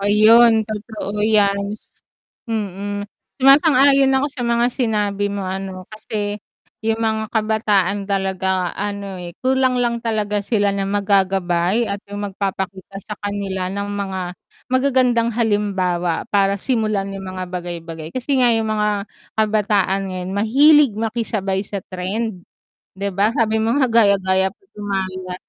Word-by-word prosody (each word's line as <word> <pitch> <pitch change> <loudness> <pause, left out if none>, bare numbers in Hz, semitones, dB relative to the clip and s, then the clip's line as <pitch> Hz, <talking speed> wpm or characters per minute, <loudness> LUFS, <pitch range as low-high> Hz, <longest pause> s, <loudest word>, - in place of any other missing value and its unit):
Ayun, 220 +2 +5
totoo 210 -1 -5
'yan. 205 -1 +2 0.7
Mm. 205 -2 -3 0.3
Sumasang-ayon 275 0 +5
ako 280 - +1
sa 260 - -6
mga 235 0 +2
sinabi 205 -4 0
mo 200 -2 -3
ano, 190 0 -5
kasi 210 -1 -5 0.4
yung 225 +1 0
mga 220 -1 0
kabataan 210 -3 +1
talaga 190 -2 0
ano, 200 -1 -4
eh, 175 -1 -8
kulang 260 -1 +2
lang 235 -1 +1
talaga 210 -2 -1
sila 205 -3 +1
ng 195 -1 -1
mag-gagabay 195 0 +1
at 200 - -3
yung 205 0 -3
magpapakita 195 0 -4
sa 210 - -7
kanila 200 -2 -3
ng 200 +1 -3
mga 195 -2 -3 0.5
magagandang 255 -3 +2
halimbawa, 195 -6 0
para 200 -1 +2
simulan 215 -5 -1
yung 195 - -7
mga 185 0 -5
bagay 175 -1 -5
bagay, 165 -1 -8
kasi 265 +2 -1
nga 245 -1 +5
yung 225 -1 0
mga 210 -1 0 0.3
kabataan 210 -3 +1
ngayon 185 0 -5
mahilig 275 +5 +5
makisabay 215 -4 -2
sa 200 -1 -5
trend. 190 +1 -4 0.5
'Di 200 +1 -2
ba, 200 +3 +2
sabi 220 -1 +1
mo 225 +3 +1
nga 265 -3 +3
gaya-gaya, 195 -4 +3
puto 380 - -19
maya. 185 -2 -3
205 Hz, 135 wpm, -20 LUFS, 195-225 Hz, 0.7 s, Ayun